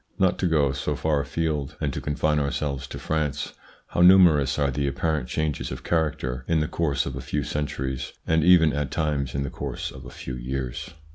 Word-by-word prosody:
Not 95 -2 +2
to 90 - +2
go 75 -5 +3
so 70 -1 -2
far 75 -2 +1
afield, 75 -2 -2
and 75 -4 -1
to - - -4
confine 75 +1 +1
ourselves 70 -1 -2
to - - -7
France, 75 -2 -2 0.4
how - - 0
numerous 85 -7 +6
are 70 -2 +2
the 70 +1 -1
apparent 75 -2 -1
changes 75 -3 -2
of - - -6
character 70 -6 -1
in 80 -1 +2
the 75 - 0
course 70 -5 0
of 65 - -4
a 65 - -5
few 70 +3 -2
centuries, 65 -3 -3
and 80 -1 +2
even 80 -3 +6
at 75 -1 -1
times 70 -4 -1
in 70 - 0
the 70 - -4
course - - -4
of 65 - -11
a - - -9
few 65 - -7
years 65 0 -4
75 Hz, 205 wpm, -25 LUFS, 70-80 Hz, 0.4 s, numerous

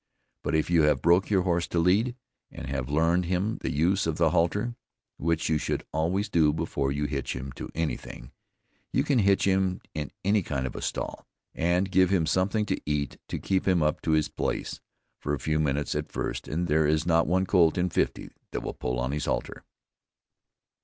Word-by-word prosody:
But - - 0
if 80 +2 +1
you 85 -2 +5
have 75 -4 +2
broke 85 +3 +4
your 95 -3 +3
horse 85 -2 0
to - - -3
lead, 100 +9 +3 0.3
and - - -8
have 65 -1 -3
learned 85 +4 +2
him 95 +5 -1
the - - -2
use 85 +6 +1
of 80 - 0
the 80 -2 +3
halter 105 +9 +1 0.4
(which 85 +1 0
you 80 -1 +2
should 75 - -2
always 90 +7 0
do 80 -6 +3
before 70 -3 -1
you 75 +1 -1
hitch 70 -1 -3
him 65 +1 -6
to - - -8
any 80 -1 -1
thing), - - -11 0.6
you - - +2
can 140 -4 +2
hitch 100 -2 +3
him 95 -1 +1
in 75 -3 -4 0.2
any 105 +1 +3
kind 70 -6 -3
of 65 - -5
a - - -5
stall, - - -4 0.3
and 90 +3 +1
give 95 -1 +4
him 95 -4 +2
something 100 +5 +1
to - - -2
eat 75 -1 -2
to - - -3
keep 95 -1 -1
him 90 -4 +3
up 75 0 0
to 80 - +1
his 75 -1 +3
place - - -3 0.4
for 75 +1 -1
a - - -8
few 75 +2 0
minutes 75 -1 0
at - - -3
first - - -3
and 85 +4 -1
there 75 0 +3
is 80 +1 +1
not 85 -1 +3
one 95 +3 +2
colt 85 -4 +4
in 90 0 +2
fifty 90 - -1 0.2
that - - -4
will - - -4
pull 60 0 -3
on 65 +2 -1
his 75 +1 -2
halter. - - -3
85 Hz, 210 wpm, -27 LUFS, 75-95 Hz, 0.6 s, you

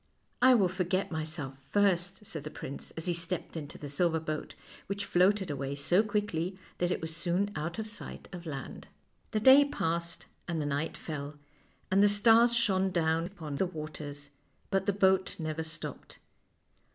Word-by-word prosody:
" - - -42
I - - +7
will 200 -5 +4
forget 185 +1 -1
myself 155 -4 -3
first," 195 +5 +1
said 155 -7 -5
the 155 - -5
prince, 140 -2 -7
as 165 - -4
he 175 - +2
stepped 170 +1 -2
into 150 -3 -6
the 145 - -7
silver 160 +3 +2
boat, 155 -1 -4 0.3
which 200 +1 -2
floated 190 -1 +3
away 140 0 -3
so 175 +7 +3
quickly 200 -4 -1 0.2
that 175 - +1
it - - -1
was 160 0 -4
soon 180 +4 0
out 160 +3 -3
of 220 -1 -3
sight 215 -1 -6
of 175 -1 -7
land. 135 -4 -6 0.4
The 215 - 0
day 265 +5 +8
passed 170 - -2 0.2
and 170 -2 -1
the 150 - -1
night 145 +4 -2
fell, 150 -3 -6 0.6
and 195 +1 +5
the 205 - +7
stars 230 +3 +5
shone 195 -5 +3
down 165 -1 +1
upon 160 -7 -6
the 190 - +1
waters, 150 -3 -7 0.4
but 195 -1 +1
the - - +5
boat 190 -1 +2
never 155 0 -2
stopped. 160 +1 -6
170 Hz, 175 wpm, -31 LUFS, 155-195 Hz, 0.6 s, day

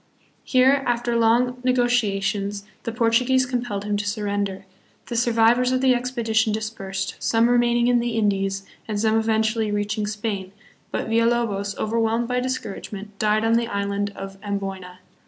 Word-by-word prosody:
Here, 265 +2 +4
after 240 0 0
long 240 +2 +2
negotiations, 205 -5 +1 0.2
the 230 - -2
Portuguese 245 +3 +2
compelled 245 -5 -3
him 205 0 -1
to 205 0 -3
surrender. 200 -2 -2 0.4
The 240 - -5
survivors 235 +1 +3
of 255 - +2
the 260 -1 +4
expedition 235 -3 0
dispersed, 195 -3 -4
some 230 +1 +2
remain 240 0 +3
ing 240 - +2
in 245 -1 +4
the 235 -1 -2
Indies, 195 -2 0 0.2
and 210 -2 -2
some 220 0 +2
eventually 220 0 +1
reaching 205 +1 -1
Spain; 205 -2 -4 0.4
but - - -3
Villalobos, 225 -3 +1
overwhelmed 230 +1 0
by 250 0 0
discouragement, 210 -4 -5
died 215 +1 +2
on 225 - +3
the 235 0 +2
island 200 -1 -2
of 195 0 -8
Amboyna. 195 -3 -5
220 Hz, 150 wpm, -23 LUFS, 205-240 Hz, 0.4 s, Here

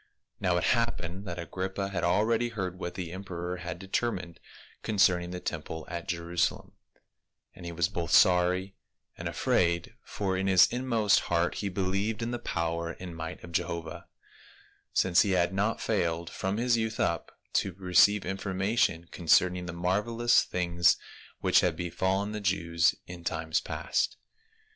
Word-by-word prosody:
Now 90 -3 +1
it - - 0
happened 100 -6 0
that 85 - -4
Agrippa 95 +3 -3
had 90 -3 -3
already 110 +6 +2
heard 95 -5 -4
what 90 - -5
the 90 -3 -5
emperor 90 -1 -5
had 90 0 -6
determined 95 -2 -3 0.4
concerning 90 -4 +2
the 90 0 -5
temple 80 -1 -5
at 85 0 -6
Jerusalem, 85 0 -1 0.8
and 90 - -10
he - - -4
was 85 -1 +1
both 85 -1 -4
sorry 90 +2 +4 0.4
and - - -5
afraid, 85 -1 +1
for 95 -2 -2
in 95 +1 -1
his 95 -2 +7
inmost 120 -5 +2
heart 85 0 +2
he 100 - -1
believed 100 +4 -1
in 115 - -2
the 120 - -3
power 85 -2 -2
and 90 -2 -7
might 80 +2 -6
of 85 - -9
Jehovah, 85 -1 -3 0.8
since 90 -2 +4
he 100 - +1
had 90 0 +2
not 105 +4 0
failed 85 -5 -1
from 95 +2 -2
his 120 0 +2
youth 110 -1 -2
up - - -1 0.2
to 95 - -5
receive 95 +2 +4
information 95 -2 0
concerning 90 +1 +2
the - - -4
marvel 95 +7 -1
ous 120 +1 +5
things 85 -1 +2 0.4
which - - +5
had - - +1
befallen 95 +4 -1
the 105 0 -4
Jews 85 -2 +2
in 85 -1 -9
times 80 -1 -1
past. - - -1
90 Hz, 155 wpm, -29 LUFS, 85-100 Hz, 0.8 s, his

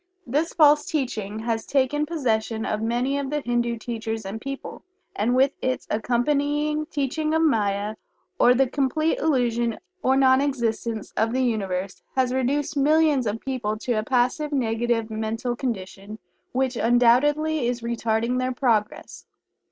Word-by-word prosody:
This 295 +7 0
false 300 -3 +5
teaching 220 -8 -2
has 225 -1 -1
taken 290 +2 0
possession 225 -8 -1
of 215 0 -2
many 245 +5 0
of 275 -1 -3
the 295 +1 -1
Hindu 240 -1 -1
teachers 225 -1 -4
and 210 +3 -6
people, 275 +2 -7 0.3
and 235 +4 +1
with 265 +2 +4
its 255 0 -1
accompanying 290 +6 0
teaching 305 +1 -1
of 320 - +3
"Maya" 210 -6 +1 0.4
or 245 - +6
the 270 +2 +4
complete 285 +4 0
illusion 240 -6 +1 0.2
or 265 +1 +3
non 260 0 +5
existence 230 -5 -2
of 225 +2 +1
the 260 0 +1
Universe, 195 -5 -2
has 255 -1 +1
reduced 275 +3 0
millions 295 -2 +3
of 210 +2 -3
people 240 -5 -3
to 240 +3 -2
a 215 - +1
passive, 255 +5 0
negative 230 -3 0
mental 225 +3 -2
condition 210 -4 -5 0.3
which 260 0 0
undoubtedly 250 +5 +3
is 245 0 -2
retarding 235 +1 -1
their 255 0 -1
progress. 230 -5 -1
245 Hz, 145 wpm, -24 LUFS, 225-280 Hz, 0.4 s, or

